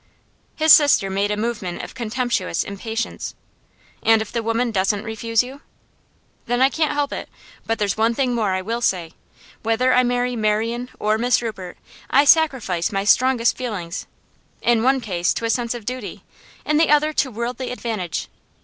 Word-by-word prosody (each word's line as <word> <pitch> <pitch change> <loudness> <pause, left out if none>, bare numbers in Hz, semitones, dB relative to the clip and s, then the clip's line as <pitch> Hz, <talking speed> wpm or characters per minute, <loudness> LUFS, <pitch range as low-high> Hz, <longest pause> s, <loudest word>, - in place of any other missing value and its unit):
His 315 -1 +6
sister 285 -10 +5
made 200 +2 0
a 210 - -1
movement 210 -5 -3
of - - -8
contemptuous 235 -7 -1
impatience. 220 +3 -5 0.7
'And 225 0 +4
if 220 -1 -5
the 235 - -1
woman 230 +2 0
doesn't 200 +1 0
refuse 225 +1 0
you?' 265 +3 -10 0.9
'Then 245 +1 0
I 265 +1 +5
can't 310 +1 0
help 290 -1 -1
it. - - -6 0.4
But 225 - 0
there's 205 -2 -1
one 225 +1 +2
thing 255 -1 0
more 215 -5 0
I 185 - -3
will 230 +4 -3
say. 175 -7 0 0.5
Whether 235 +3 +2
I 250 - +5
marry 245 0 0
Marian 225 +3 -1
or 215 +1 0
Miss 245 +1 +3
Rupert, 205 -6 -6 0.3
I 280 +2 +4
sacrifice 255 - +3
my 195 -1 -1
strongest 245 +2 +3
feelings 200 -8 -5 0.6
in 240 -1 +3
the 225 - -1
one 265 0 +3
case 175 -5 -1
to 230 - -3
a 225 - +1
sense 240 -1 -1
of 235 -3 -8
duty, 250 -3 -6 0.4
in 300 - +2
the 320 - +3
other 300 +1 +3
to 270 - +1
worldly 240 +2 -4
advantage. 220 -9 -4
230 Hz, 175 wpm, -21 LUFS, 210-250 Hz, 0.9 s, His